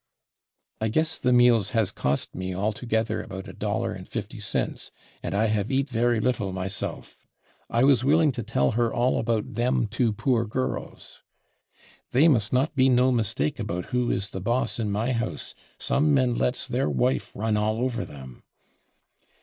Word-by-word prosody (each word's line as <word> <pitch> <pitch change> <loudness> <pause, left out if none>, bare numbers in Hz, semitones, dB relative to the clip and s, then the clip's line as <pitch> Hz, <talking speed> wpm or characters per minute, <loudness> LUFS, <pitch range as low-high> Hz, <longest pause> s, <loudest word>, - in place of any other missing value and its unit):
I 110 - 0
guess 155 +8 0
the 125 - +1
meals 120 -4 +4
/has/ 110 -5 +1
cost 70 +1 -1
me 95 0 -4
all 105 +4 0
together 110 -1 -1
about 95 0 -8
$1.50, - - -3 0.3
and - - -3
I 110 +2 +2
have 105 -2 0
/eat/ 135 +1 0
very 120 -1 +1
little 105 -4 0
myself.... 95 +1 -5 0.4
I 120 +2 +2
was 135 -3 +4
willing 155 +2 +4
to 120 - -5
tell 85 -12 +1
her 120 0 +1
all 125 +2 +1
about 115 -2 -1
/them/ 120 0 +1
two 115 +2 0
poor 115 +2 +1
girls.... 130 +4 -4 0.9
They 140 +6 +6
must 115 -9 +3
not 135 +4 +1
be 130 -1 +4
/no/ 125 +1 +4
mistake 100 -10 -1
about 90 +1 -3
who 125 -1 +1
is 100 +1 -1
the 95 - -5
boss 120 +4 0
in 110 -2 -1
my 110 +5 0
house. 120 -1 -3 0.2
Some 145 +1 +2
men 130 -3 +2
/lets/ 125 +2 0
their 130 +1 0
/wife/ 125 +1 0
run 110 +1 0
all 105 +1 0
over 120 -1 -1
them.... 65 -3 -11
115 Hz, 165 wpm, -26 LUFS, 105-125 Hz, 0.9 s, They